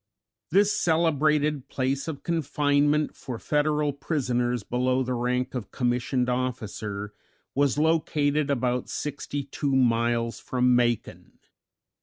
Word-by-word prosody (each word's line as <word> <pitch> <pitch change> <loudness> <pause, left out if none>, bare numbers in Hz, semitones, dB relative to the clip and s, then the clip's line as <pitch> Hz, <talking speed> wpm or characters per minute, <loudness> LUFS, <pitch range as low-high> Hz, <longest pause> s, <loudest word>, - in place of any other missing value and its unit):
This 200 +4 +3
celebrated 150 -3 +2
place 135 +1 -2
of 155 -4 -5
confinement 150 -2 +1
for 125 -3 -6
Federal 150 +2 +1
prisoners 125 -5 -1
below 125 +3 0
the 130 0 -2
rank 125 +1 -1
of 120 -6 -5
commissioned 125 0 0
officer 110 -5 -3 0.4
was 140 -1 +2
located 150 -2 +1
about 125 -2 0
sixty 145 -1 -4
two 140 0 -2
miles 115 -2 +1
from 125 -1 +2
Macon. 120 -2 -1
130 Hz, 110 wpm, -26 LUFS, 125-150 Hz, 0.4 s, This